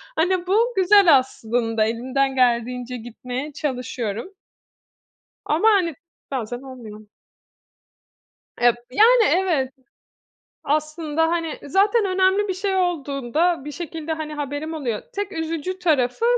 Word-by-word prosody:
Hani 360 +2 +1
bu 455 +6 +2
güzel 380 -5 +6
aslında, 225 -3 -1
elimden 260 +4 -1
geldiğince 250 0 0
gitmeye 250 +5 -6
çalışıyorum. 250 - -4 1.1
Ama 330 +9 +2
hani, 365 -6 +2 0.4
bazen 245 -2 -4
olmuyor. 225 -5 -11 1.5
Eee, 240 -1 +5 0.2
yani 455 - +5
evet. 335 -10 +1 0.9
Aslında 305 +1 -1
hani 330 -2 -2
zaten 405 - +2
önemli 380 +2 +2
bir 380 - -1
şey 385 +1 -1
olduğunda 315 -2 0
bir 295 - -6
şekilde 325 -1 -5
hani 310 -1 -5
haberim 295 +2 -4
oluyor. 245 -9 -3
Tek 405 0 -3
üzücü 330 +2 -3
tarafı, 295 - +1
300 Hz, 110 wpm, -22 LUFS, 250-365 Hz, 1.5 s, güzel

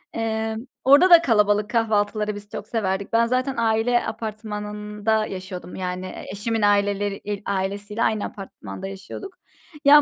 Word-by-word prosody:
eee, 220 -1 -1 0.3
orada 285 +8 +7
da 340 -2 +9
kalabalık 210 -6 +3
kahvaltıları 215 -2 +1
biz 205 0 -10
çok 205 - -7
severdik. 200 -3 -2
Ben 230 +1 +5
zaten, 255 +3 0
aile 230 +1 +2
apartmanında 210 -1 -2
yaşıyordum. 185 -2 -7
Yani, 185 0 -4 0.2
eşimin 220 +3 -2
aileler 205 0 +2
il 205 -1 -4
ailesiyle 200 +3 -2
aynı 215 -2 +1
apartmanda 190 - -8
yaşıyorduk. 195 - -8 0.5
Ya, 295 +1 +9
210 Hz, 130 wpm, -23 LUFS, 200-225 Hz, 0.5 s, da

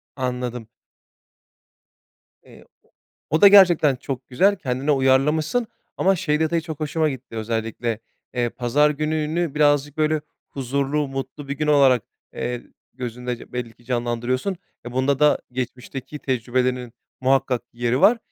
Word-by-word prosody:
Anladım. 125 -3 -3 1.8
Eee, - - -16 0.2
o - - -33 0.4
o 160 +3 +2
da 200 - +10
gerçekten 175 -8 +6
çok 130 0 -6
güzel. 195 +11 +3
Kendine 130 +2 -2
uyarlamışsın 150 - +2 0.3
ama 190 +1 +3
şey 150 -4 0
detayı 160 +1 +1
çok 160 -3 -7
hoşuma 155 +1 0
gitti: 130 -4 -7
Özellikle, 115 0 -2 0.4
eee, 120 -1 +1
pazar 130 +6 +2
gününü 155 +1 -1
birazcık 145 -1 +2
böyle 155 0 +1 0.3
huzurlu, 140 +2 -1
mutlu 135 +1 -6
bir 140 - -2
gün 155 - -1
olarak, 135 -5 +5 0.3
eee, 120 0 -3 0.3
gözünde 125 -1 -6
belli 125 -2 -4
ki 120 - -24
canlandırıyorsun. 125 +8 -1 0.3
Bunda 130 +3 0
da 150 0 +4
geçmişteki 130 +3 -5
tecrübelerinin 125 -1 -1 0.3
muhakkak 130 -1 +2
yeri 120 +2 0
var. 230 +3 +6
135 Hz, 130 wpm, -23 LUFS, 125-150 Hz, 1.8 s, da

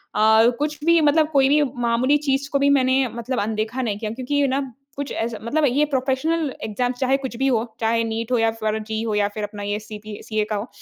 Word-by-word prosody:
अ, 220 +2 +5
कुछ 300 +1 -1
भी 335 0 +5
मतलब 305 +1 +4
कोई 275 -3 +4
भी 300 +1 +4 0.2
मामूली 245 +5 +3
चीज़ 275 0 0
को 280 - +1
भी 280 0 +3
मैंने 265 -1 +3
मतलब 240 +2 -3
अनदेखा 220 +4 -2
नहीं 215 -5 -2
किया 215 -1 -3
क्योंकि 255 +4 -4
ये 285 0 +3
ना 265 +1 0 0.4
कुछ 285 0 -4
ऐसा 225 -1 -3
मतलब 295 +7 +1
ये 280 +4 +2
प्रोफ़ेशनल 280 +2 -1
एग्ज़ाम 245 +3 -1
चाहे 265 0 +2
कुछ 265 -3 -6
भी 270 +2 +1
हो, 235 -4 +2 0.2
चाहे 230 0 +1
नीट 225 +1 -3
हो 250 - +3
या 225 0 +2
फिर 220 -1 -2
जी 220 0 -2
हो 220 -2 -1
या 205 -1 +2
फिर 215 - -4
अपना 205 0 -6
ये 205 +1 -2
सीपी 210 -1 -9
सीए 215 -1 -1
का 215 - -1
हो 205 +3 -3
245 Hz, 240 wpm, -22 LUFS, 220-275 Hz, 0.4 s, अ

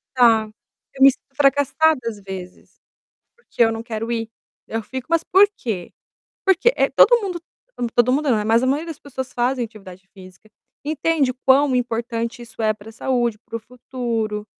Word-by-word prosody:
Tá, 225 -3 +4 0.5
eu 265 - +2
me 275 - +9
sinto 270 0 -19
fracassada 285 +2 +3
às 220 -2 -4
vezes, 190 -2 -10 0.6
porque 480 - -17
eu 225 -1 +5
não 225 0 -5
quero 225 0 -5
ir, 225 -1 -3 0.4
eu 225 - -2
fico: 260 -1 -7
"Mas 335 -1 +2
por 395 +2 +5
quê?" 200 -8 -5 0.5
Porque, 385 +6 +4
eh, - - +2
todo 480 -2 +5
mundo 360 -4 -4 0.5
todo 240 +1 +4
mundo, 290 +2 +1
não, 215 -4 +1
mas 225 +1 +3
a - - 0
maioria 295 +5 0
das 325 -4 -7
pessoas 260 -2 -7
fazem 245 +1 0
atividade 195 -4 -13
física, 190 +2 -15 0.3
entende 300 -2 0
quão 270 0 +5
importante 235 0 -2
isso 230 -1 -9
é 215 -1 +2
para 215 +1 -13
saúde, 240 -2 -1
para 230 - -10
o 230 - -2
futuro, 230 -3 -4
240 Hz, 175 wpm, -21 LUFS, 225-275 Hz, 0.6 s, me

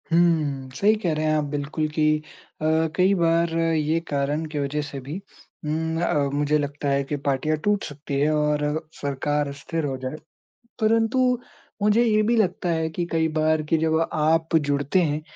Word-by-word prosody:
हुँ, 155 -6 +2
सही 210 +9 +4
कह 170 -3 +1
रहे 155 0 -1
हैं 155 0 +2
आप 150 - +1
बिल्कुल 150 +2 -2
कि 155 0 +1 0.5
अ, - - -4 0.3
कई 185 +2 +4
बार 170 -1 +2
ये 165 -1 +1
कारण 145 +2 -1
की 150 - -1
वजह 145 +1 -1
से 145 -1 -6
भी 140 +5 -6 0.5
उम, 160 +2 -1
अ, 175 - +1 0.2
मुझे 145 +1 +2
लगता 145 0 -2
है 140 0 +2
कि 145 +2 -3
पार्टियाँ 145 +3 +1
टूट 205 -1 +1
सकती 145 -1 -4
हैं 145 +2 +3
और 150 +1 0
सरकार 145 +1 -1
स्थिर 155 +3 -4
हो 135 -2 -2
जाए। 130 +2 -5 0.7
परंतु, 225 +2 +2 0.6
मुझे 210 +3 +4
ये 215 -2 +3
भी 235 +3 +2
लगता 185 -3 +1
है 160 -1 0
कि 170 +2 -3
कई 160 -1 +2
बार 155 0 +2
कि 165 - +3
जब 160 0 +1
आप 160 +2 +2
जुड़ते 145 +3 +2
हैं, 150 -1 -1
155 Hz, 180 wpm, -24 LUFS, 145-165 Hz, 0.7 s, सही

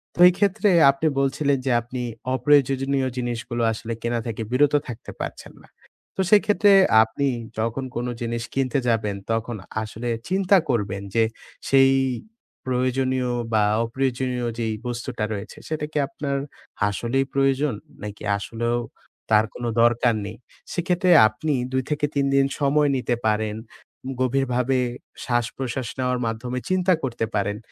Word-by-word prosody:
তো - - -12
এইক্ষেত্রে 200 +3 +2 0.2
আপনি 140 +3 -1
বলছিলেন 140 +1 +1
যে, 130 - +1
আপনি 125 +2 -6 0.3
অপ্রয়োজনীয় 135 0 +2
জিনিসগুলো 120 -1 -3
আসলে 115 +1 -5
কেনা 120 0 -1
থেকে 115 -1 -4
বিরত 145 +3 +3
থাকতে 115 -3 -8
পারছেন - - -6
না। - - -20 0.5
তো 190 - +2
সেক্ষেত্রে 205 -1 +5 0.3
আপনি 140 +5 -2 0.3
তখন 115 +4 -1
কোনো 120 +1 -2
জিনিস 115 0 -2
কিনতে 135 0 0
যাবেন, 110 -3 +1 0.2
তখন 115 +1 -1 0.3
আসলে 110 +2 -5 0.2
চিন্তা 190 +1 +4
করবেন 100 -5 -1
যে, 115 - +5 0.5
সেই 135 -1 +6 0.7
প্রয়োজনীয় 130 0 0 0.2
বা, 110 -1 +4 0.2
অপ্রয়োজনীয় 125 0 -1
যেই 110 -1 -1
বস্তুটা 120 -2 -4
রয়েছে, 100 +2 -7
সেটা 155 -1 -2
কি 155 - -3
আপনার 140 0 -3 0.5
আসলেই 120 +6 -1
প্রয়োজন? 135 0 +2 0.3
নাকি 105 -1 -7
আসলেও 115 +3 -2 0.5
তার 110 0 +5
কোনো 120 -1 -3
দরকার 120 0 +3
নেই? 105 +4 -7 0.4
সেক্ষেত্রে 180 +1 +1 0.2
আপনি 145 +8 -2 0.2
২ 130 0 0
থেকে 150 0 0
৩ 140 -1 +2
দিন 135 - +5
সময় 145 +1 +3
নিতে 125 -1 0
পারেন, 105 0 0 0.7
গভীরভাবে 130 0 +1 0.5
শ্বাসপ্রশ্বাস 120 0 -2
নেওয়ার 125 -1 0
মাধ্যমে 125 +3 -3
চিন্তা 185 0 +3
করতে 120 -3 -1
পারেন। 100 0 0
125 Hz, 135 wpm, -23 LUFS, 115-140 Hz, 0.7 s, সেই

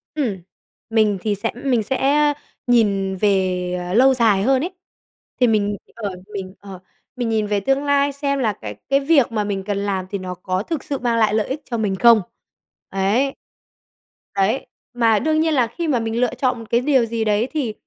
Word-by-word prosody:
Ừm, 245 -11 -1 0.5
mình 215 -3 +2
thì 210 -2 0
sẽ 200 - -2
mình 245 -3 0
sẽ, 265 +5 -1 0.2
ơ, 295 0 +3 0.3
nhìn 200 -5 +2
về, 185 -2 +1
ờ, 180 - -3
lâu 265 +4 +6
dài 220 -6 +3
hơn 265 +2 +3
ấy. 360 - -3 0.7
Thì 250 - +5
mình 205 -2 +1 0.2
ờ, 205 -5 -4 0.2
mình, 190 -2 -5
ờ 195 -2 -10 0.4
mình 245 -3 -2
nhìn 215 -2 0
về 205 -1 +1
tương 270 +7 0
lai 285 0 +2
xem 280 0 -2
là 225 -5 +1
cái 105 - -8
cái 275 0 +4
việc 280 -4 +3
mà 215 -2 0
mình 200 -2 -3
cần 200 0 -2
làm 200 -2 -2
thì 200 - -3
nó 185 -1 -5
có 185 +1 -3
thực 315 +2 -4
sự 280 - -3
mang 235 -2 0
lại 215 -2 +3
lợi 215 -1 +1
ích 285 +3 -4
cho 235 - -3
mình 205 -3 0
không? 230 +1 +6 0.7
Đấy. 210 +8 +1 1.0
Đấy. 200 +7 +1 0.3
Mà 225 -3 +3
đương 310 +1 +1
nhiên 320 0 +1
là 250 -5 +3
khi 330 +8 -4
mà 255 -6 +2
mình 225 +1 -2
lựa 250 - +1
chọn 255 -2 0
một 230 - -9
cái 235 +1 +2
điều 260 -4 +3
gì 225 0 -2
đấy 215 +3 +1
thì, 270 -9 -2
225 Hz, 210 wpm, -21 LUFS, 200-265 Hz, 1.0 s, lâu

